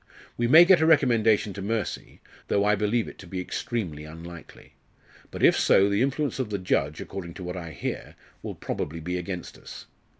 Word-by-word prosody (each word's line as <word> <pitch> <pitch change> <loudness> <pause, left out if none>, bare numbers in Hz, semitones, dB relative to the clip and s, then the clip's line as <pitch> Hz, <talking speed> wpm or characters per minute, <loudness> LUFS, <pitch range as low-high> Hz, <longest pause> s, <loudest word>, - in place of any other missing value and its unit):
We 120 - 0
may 160 +7 +8
get 180 -2 +5
a 160 - +3
recommendation 115 -9 +3
to 100 - -7
mercy, 105 0 -4 0.3
though 100 0 +1
I 105 - +4
believe 105 +3 0
it - - -11
to 95 - -11
be 95 +1 -5
extremely 90 -5 -4
unlikely. 85 +2 -12 0.6
But - - -6
if - - +6
so, 100 +1 +4
the 100 +2 +1
influence 140 +2 -1
of 130 -5 -2
the 100 - -2
judge, 75 -5 -1
according 90 -3 -7
to 95 - -8
what 90 +1 -5
I 85 -2 -6
hear, 80 - -6 0.3
will - - -6
probably 80 +3 -4
be 90 +3 -3
against 90 0 -7
us. - - -11
100 Hz, 195 wpm, -26 LUFS, 85-120 Hz, 0.6 s, may